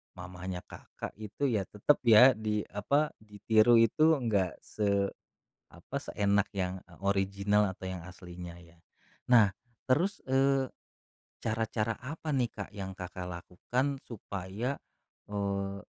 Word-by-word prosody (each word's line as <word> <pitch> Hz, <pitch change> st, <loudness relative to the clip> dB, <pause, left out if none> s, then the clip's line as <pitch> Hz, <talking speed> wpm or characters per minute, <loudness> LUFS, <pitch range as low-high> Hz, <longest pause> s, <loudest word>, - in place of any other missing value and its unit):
mamanya 90 Hz, 0 st, -6 dB
Kakak -, -, -8 dB
itu 110 Hz, +6 st, -2 dB
ya, 105 Hz, -5 st, +1 dB
tetep 105 Hz, +10 st, +2 dB
ya, 120 Hz, +3 st, +9 dB
di, 105 Hz, -1 st, -1 dB
apa, 140 Hz, +9 st, +1 dB
ditiru 110 Hz, +2 st, +4 dB
itu, 155 Hz, +8 st, +4 dB
enggak 100 Hz, -6 st, +1 dB
se 100 Hz, -2 st, 0 dB, 0.6 s
apa, -, -, -10 dB
seenak 100 Hz, 0 st, +1 dB
yang 95 Hz, 0 st, -1 dB, 0.3 s
original 100 Hz, +1 st, +2 dB
atau 95 Hz, -, -10 dB
yang 95 Hz, -2 st, -5 dB
aslinya 90 Hz, -1 st, -9 dB
ya. 85 Hz, -1 st, -18 dB, 0.5 s
Nah 110 Hz, -5 st, +7 dB, 0.4 s
terus, 170 Hz, +10 st, +2 dB
eee, 135 Hz, 0 st, +3 dB, 0.7 s
cara-cara 110 Hz, 0 st, -1 dB
apa 150 Hz, +2 st, -3 dB
nih, 125 Hz, -3 st, +1 dB
Kak, 100 Hz, -, -7 dB
yang 95 Hz, -1 st, -5 dB
Kakak 90 Hz, 0 st, -6 dB
lakukan 105 Hz, +10 st, -2 dB
supaya, 105 Hz, +3 st, -4 dB, 0.6 s
eee, 100 Hz, -1 st, -2 dB
105 Hz, 120 wpm, -31 LUFS, 95-120 Hz, 0.7 s, ya